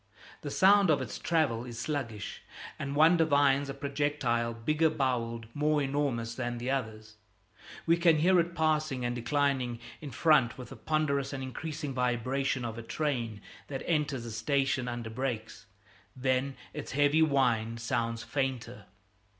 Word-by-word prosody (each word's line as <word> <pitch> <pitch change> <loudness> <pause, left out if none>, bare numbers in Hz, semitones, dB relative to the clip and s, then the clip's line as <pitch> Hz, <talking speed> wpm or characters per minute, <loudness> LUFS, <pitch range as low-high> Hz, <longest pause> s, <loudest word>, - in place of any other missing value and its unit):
The 145 - -5
sound 195 +4 +5
of 155 - +4
its - - -5
travel 150 -9 +1
is 120 -2 -8
sluggish, 115 -5 -4 0.4
and 140 0 -3
one 160 +4 +6
divines 145 -3 +3
a - - -3
projectile 140 -4 -1
bigger 155 +8 +1
boweled, 120 -6 -1
more 150 +1 +2
enormous 135 -5 -1
than 120 0 -3
the 125 +2 -2
others. 110 -5 -4 0.7
We 165 +1 +4
can 170 -2 +4
hear 180 +4 +4
it 170 0 -1
passing 155 -5 0
and 120 0 -1
declining 130 -1 0 0.2
in 150 - -6
front 140 -1 +3
with 125 -2 -9
the - - -9
ponderous 145 -3 -1
and 135 -1 -4
increasing 150 +2 -5
vibration 125 +1 0
of 115 0 -5
a - - -5
train 115 -5 -2 0.3
that 135 -2 -5
enters 150 -7 0
a 115 - -6
station 135 +2 0
under 120 -2 -4
brakes; 125 -2 -4 0.5
then, 130 +1 0 0.2
its - - -6
heavy 145 +3 +3
whine 120 -7 +2
sounds 115 0 -2
fainter. 125 -6 -3
135 Hz, 150 wpm, -30 LUFS, 120-150 Hz, 0.7 s, one